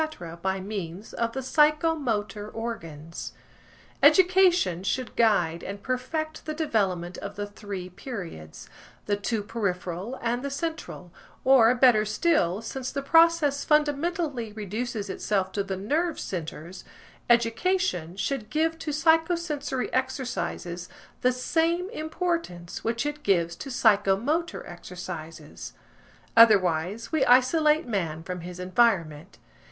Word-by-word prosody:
–by 190 +1 -1
means 190 -1 -6
of 230 0 -1
the 265 - -3
psychomotor 275 -8 +1
organs. 165 -9 -6 0.7
Education 360 - +5
should 240 +6 -2
guide 175 -8 +2
and 200 +1 -7
perfect 310 +5 -3
the 310 - -3
development 190 - -1
of 200 0 -7
the 205 0 -3
three 205 -3 -7
periods, 180 - -8 0.4
the 205 - +1
two 205 +1 -2
peripheral 195 0 -3
and 240 +1 -1
the 280 - -3
central; 285 - -5 0.3
or, 255 -2 +6
better 245 -4 +5
still, 215 - +1
since 260 +2 -5
the 275 0 -3
process 325 -2 +4
fundamentally 300 -4 0
reduces 215 +1 -4
itself 190 0 -1
to 200 - -1
the 195 -1 -4
nerve 300 - -1
centres, 170 0 -6 0.5
education 235 - +1
should 215 +1 -2
give 325 +1 0
to 315 - -5
psychosensory 320 -3 +1
exercises 250 -9 -3 0.3
the 250 - +4
same 335 - 0
importance 315 - -3
which 235 +4 -1
it 295 0 -3
gives 170 - +1
to 275 - -8
psychomotor 235 - +2
exercises. 175 -2 -8 0.6
Otherwise, 200 -2 +4
we 315 -4 +2
isolate 300 +5 +4
man 165 -8 -2
from 180 +1 -5
his 180 +1 -8
environment. 180 -4 +1
230 Hz, 115 wpm, -26 LUFS, 185-295 Hz, 0.7 s, or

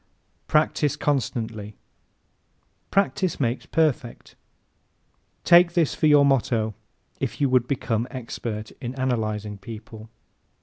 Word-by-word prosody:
Practise 150 -2 +2
CONSTANTLY 110 -7 -2 1.1
¶ - - -43
"Practice 195 -2 +1
makes 120 -2 -1
perfect." 150 -6 -1 1.1
Take 175 0 +6
this 170 -4 +2
for 155 - +1
your 145 -1 +6
motto 115 -5 +1 0.5
if - - -3
you 140 - +3
would 125 -1 +3
become 120 -3 -1
expert 115 -4 -6
in 125 0 -5
analyzing 110 -5 -2
people. 110 0 -10
125 Hz, 105 wpm, -24 LUFS, 110-145 Hz, 1.1 s, Take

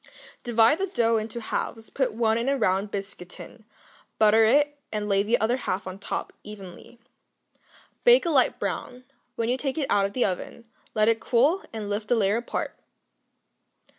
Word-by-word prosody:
Divide 235 +4 +4
the 390 - 0
dough 230 - +2
into 220 +2 -4
halves; 225 0 -4
put 265 -2 0
one 220 0 +1
in 240 +3 0
a 275 - +1
round 195 -3 +1
biscuit 195 -3 -6
tin, 220 +4 -11 0.5
butter 220 +1 +5
it, 290 +5 +3
and 210 -1 -3
lay 195 -1 +3
the 220 +4 +1
other 235 +3 +1
half 195 -6 -3
on 185 +1 -7
top, - - -4
evenly. 205 +1 -11 1.1
Bake 485 -4 +6
a 340 - +1
light 270 -4 +3
brown; 250 0 -4 0.3
when 230 - -1
you 250 +2 0
take 270 +1 -3
it 300 - 0
out 200 -1 +3
of 200 - -12
the 250 - +1
oven, 200 +4 -4 0.3
let 215 0 +3
it 225 0 +3
cool, 270 - +2
and 220 -1 -5
then 205 - -6
lift 210 +1 -3
the 245 - +3
layer 205 -1 +2
apart. 240 - -4
225 Hz, 185 wpm, -26 LUFS, 205-250 Hz, 1.1 s, Bake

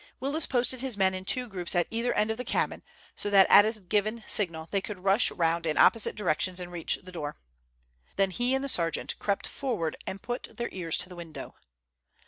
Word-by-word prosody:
Willis 285 +5 +2
posted 250 0 0
his 260 -5 -2
men 190 -1 +3
in 185 0 -6
two 250 +4 0
groups 180 -5 -1
at 175 -1 +3
either 230 +2 0
end 215 +1 +1
of 220 - -3
the 250 - -4
cabin, - - -1 0.3
so 205 - -3
that 195 -2 +7
at 205 - +9
a 220 0 -1
given 215 +4 -1
signal 165 -5 +2
they 195 - +1
could 190 -2 -8
rush 195 +4 +4
round 165 -1 0
in 155 - -1
opposite 230 - +4
directions 185 -2 0
and 180 -1 -7
reach 175 -2 0
the 185 - -11
door. 150 -4 -5 0.8
Then 195 -1 +2
he 245 +6 +1
and 265 - -1
the - - -2
sergeant 170 -10 -1
crept 200 -1 -1
forward 220 - -3
and 190 - -4
put 245 +5 -6
their 235 -1 -2
ears 170 -4 -1
to 180 - -3
the 180 - -10
window. 160 -5 -9
195 Hz, 215 wpm, -28 LUFS, 175-235 Hz, 0.8 s, at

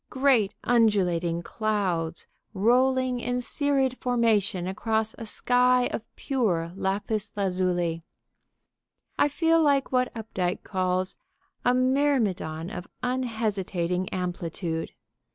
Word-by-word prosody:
Great, 260 -7 +2
undulating 180 -8 +2
clouds, 185 -7 -1 0.3
rolling 255 +4 +3
in 245 +1 -1
serried 270 0 0
formation 220 -7 +1
across 220 +3 -1
a 230 - -6
sky 250 +2 +3
of - - -2
pure 190 - -1
lapis 205 +2 -2
lazuli. 180 -3 0 1.2
I - - +5
feel 325 +3 +2
like 280 -3 +2
what 255 -1 +2
Updike 190 -5 -3
calls 185 -1 -1 0.5
a 245 0 +3
"myrmidon 250 - +1
of 180 -4 -6 0.2
unhesitating 205 -8 -1
amplitude." 175 -2 -3
215 Hz, 100 wpm, -26 LUFS, 180-250 Hz, 1.2 s, I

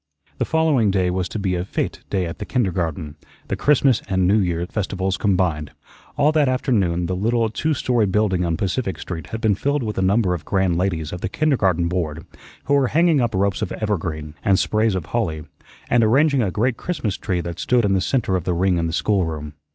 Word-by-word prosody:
The - - +1
following 155 -9 +2
day 95 -2 +1
was 90 -1 -2
to - - -5
be 95 -3 -1
a 90 -1 -1
fete 95 - -3
day 95 -2 0
at 85 - -6
the - - -4
kindergarten, 85 - -2 0.3
the - - 0
Christmas 140 -4 +3
and 95 -2 +2
New 105 +3 +4
Year 85 -3 0
festivals 95 -1 -2
combined. 90 -7 0 0.5
All 145 +1 +4
that 150 -4 +2
afternoon 100 -10 +1
the 90 +2 -2
little 115 +3 +1
two 155 +6 -1
story 120 -5 +1
building 95 -2 +1
on 85 -2 -1
Pacific 95 +1 -2
Street 85 -3 -6
had 110 - -6
been 110 -2 +3
filled 140 +7 -1
with 105 -3 -3
a - - +1
number 95 0 +2
of 85 - -4
grand 95 -3 +1
ladies 85 -4 -1
of 90 - -6
the - - -2
Kindergarten 95 - +1
Board, 85 -2 -3 0.4
who 145 - 0
were 140 -2 +4
hanging 160 +1 +3
up 120 -4 0
ropes 100 0 0
of - - -2
evergreen 80 -8 -3
and 95 -1 +3
sprays 110 0 +1
of 90 -4 -3
holly, 80 -7 -2 0.4
and 120 -1 +3
arranging 135 +5 +3
a 105 - +1
great 115 +6 0
Christmas 140 - -3
tree 90 -4 -2
that 85 0 -5
stood 125 -3 +2
in 100 - +2
the 95 - +2
centre 110 -2 0
of 90 - -1
the 90 0 -1
ring 90 0 +2
in 85 - 0
the 80 - -4
schoolroom. 80 -7 -1
95 Hz, 215 wpm, -21 LUFS, 90-115 Hz, 0.5 s, New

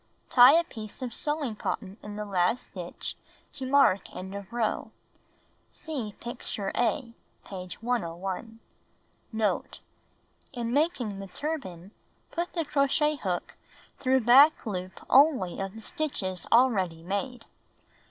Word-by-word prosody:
Tie 250 +2 +9
a 335 +1 +5
piece 220 - -9
of 245 -3 -4
sewing 295 -6 -2
cotton 200 -1 -4
in 210 0 -8
the 210 0 -4
last 195 +4 0
stitch 175 -2 -5 0.4
to 265 -2 -5
mark 275 -8 +4
end 190 +1 -6
of 200 -1 -7
row. 230 -2 -1 0.8
(See 260 - -5
picture 225 -4 -4
A, 240 0 0 0.3
page 185 +2 -8
101.) 205 -1 -3 0.7
Note. 220 -2 -1 0.4
— - - -40 0.3
In 240 -2 -3
making 255 - 0
the 195 - -6
turban, 195 - -5 0.4
put 345 +1 -3
the 330 -3 -1
crochet 295 +2 +2
hook 185 -8 -3 0.5
through 260 -1 +3
back 270 +7 +7
loop 185 -3 -5
only 265 - +4
of 195 +1 -4
the 225 - -9
stitches 220 - -3
already 195 -10 +3
made. 225 +6 -3
225 Hz, 130 wpm, -28 LUFS, 195-270 Hz, 0.8 s, Tie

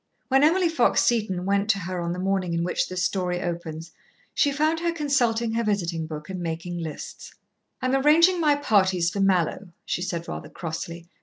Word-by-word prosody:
When 270 +1 +4
Emily 345 +4 +4
Fox 325 -7 +2
Seton 210 -6 0
went 200 +1 +1
to 200 - +4
her 180 0 -4
on 170 0 -2
the 180 - -3
morning 185 -2 -1
in 170 - 0
which 180 - -1
this 185 -1 -2
story 180 -1 -1
opens, 170 -2 -5 0.4
she 285 - +2
found 310 +3 +1
her 340 0 0
consulting 245 -8 +1
her 230 +1 0
visiting 170 -6 -1
book 150 -1 -7
and 185 -2 -5
making 170 +1 -4
lists. 160 -2 -7 0.5
"I'm 255 +1 +1
arranging 325 +6 +5
my 300 -2 +4
parties 190 -10 +2
for 200 - -4
Mallowe," 190 0 +1 0.2
she - - -2
said 170 -2 -3
rather - - -6
crossly. 170 0 -6
190 Hz, 185 wpm, -25 LUFS, 170-260 Hz, 0.5 s, arranging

